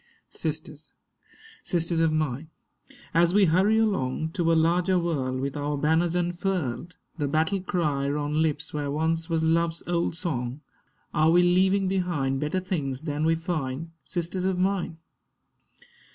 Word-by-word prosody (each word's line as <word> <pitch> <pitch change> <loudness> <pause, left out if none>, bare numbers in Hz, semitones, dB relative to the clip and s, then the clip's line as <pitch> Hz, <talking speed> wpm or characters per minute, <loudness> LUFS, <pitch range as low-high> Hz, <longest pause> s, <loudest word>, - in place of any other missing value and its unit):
Sisters, - - -5 0.7
sisters 170 -1 0
of 165 -1 +3
mine, 155 -1 -1 0.6
as 170 +2 +3
we 205 -1 +6
hurry 190 +6 +3
along 160 -9 0
To 165 -2 +1
a - - +4
larger 175 +3 +3
world, 140 -7 -1
with 135 +1 -3
our 145 0 -2
banners 160 +4 +2
unfurled, 175 -3 -2 0.2
The 145 - 0
battle 160 +6 +1
cry 150 -7 0
on 150 +1 0
lips 155 -2 -1
where 145 -1 -2
once 160 +3 -1
was 165 -1 +1
Love's 165 +1 +1
old 170 -1 0
song, 140 -6 -3 0.5
Are 155 +1 +4
we 175 +2 +5
leaving 190 +2 +3
behind 175 -8 0
better 150 +5 -1
things 150 -7 -3
than 150 -1 -1
we 165 0 +3
find, 160 -2 -3
Sisters 175 +1 -3
of 190 -1 0
mine? 185 -3 0
165 Hz, 145 wpm, -26 LUFS, 150-180 Hz, 0.7 s, we